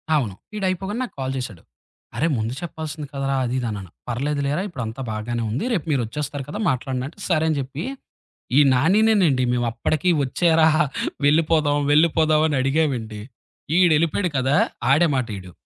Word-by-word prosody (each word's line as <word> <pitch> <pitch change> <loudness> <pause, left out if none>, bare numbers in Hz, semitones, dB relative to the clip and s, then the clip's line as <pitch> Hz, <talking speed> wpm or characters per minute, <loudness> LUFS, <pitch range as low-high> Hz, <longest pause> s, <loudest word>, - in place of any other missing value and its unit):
అవును. 115 -10 -1 0.2
వీడయిపోగానే 195 +1 -2
నాకు 250 - -7
కాల్ 130 0 -2
చేశాడు. 110 -9 -6 0.5
అరే 160 - +1
ముందు 110 +2 -2
చెప్పాల్సింది 155 -3 -6
కదరా! 135 0 -1
అది 120 - -2
ఇది 120 - -2
అన్నాను. 100 -4 -6 0.2
"పర్లేదులేరా 140 +5 -1
ఇప్పుడు 160 - -5
అంతా 115 +5 -7
బాగానే 115 +2 -3
ఉంది. 120 - -2
రేపు 180 -9 -1
మీరు 135 -4 +2
వచ్చేస్తారు 145 +4 -4
కదా! 180 - -5
మాట్లాడడి" 130 0 -2
అంటే 165 +7 -14
సరే 160 -3 +2
అని 155 - 0
చెప్పి. 135 +4 -5 0.7
ఈ - - +8
నానినేేనండి, 180 - +3
మేవప్పటికి 120 +7 0
వచ్చేరా 160 +4 +3 0.6
వెళ్ళిపోదాం, 155 -1 +3
వెళ్ళిపోదాం 155 0 +4
అని 145 -3 0
అడిగామండి. 130 -7 -1 0.6
ఈడెళ్ళిపోాయాడు 170 +1 +3
కదా! 135 +2 +2 0.3
ఆడే 165 +5 +5
మాట 130 -3 0
ఈడు. 90 -1 -10
145 Hz, 150 wpm, -22 LUFS, 125-160 Hz, 0.7 s, ఈ